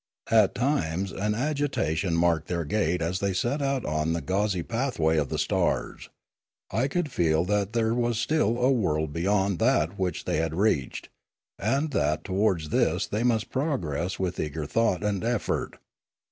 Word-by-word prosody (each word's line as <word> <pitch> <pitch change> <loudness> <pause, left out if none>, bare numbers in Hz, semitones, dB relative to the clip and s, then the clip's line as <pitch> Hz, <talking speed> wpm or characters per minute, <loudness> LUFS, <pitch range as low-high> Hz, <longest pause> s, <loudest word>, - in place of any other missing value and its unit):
At 110 -4 +4
times 95 - 0
an 105 +2 -1
agitation 115 - 0
marked 85 -2 +2
their 85 -2 -2
gait 90 0 0
as 90 +3 -1
they 100 -1 0
set 120 +10 -1
out 135 -3 0
on 75 +2 0
the 85 - -2
gauzy 95 +2 0
pathway 115 - 0
of 75 -3 0
the - - -2
stars. - - -1 0.6
I 115 +7 +1
could 155 0 -2
feel 80 -3 +2
that 105 +1 0
there 115 -1 +1
was 120 -1 0
still 120 -2 +1
a 125 +2 +3
world 80 - 0
beyond 95 +2 +1
that 85 +6 +2
which 90 -2 -2
they - - 0
had 80 0 -1
reached, 85 - 0 0.5
and 135 - 0
that 75 - 0
towards 95 -5 0
this - - +1
they 105 - -2
must 115 -3 +1
progress 95 - -2
with 90 -1 -2
eager 75 0 -3
thought 105 +2 +1
and 105 -2 -1
effort. 120 -1 -1
100 Hz, 165 wpm, -26 LUFS, 80-115 Hz, 0.6 s, At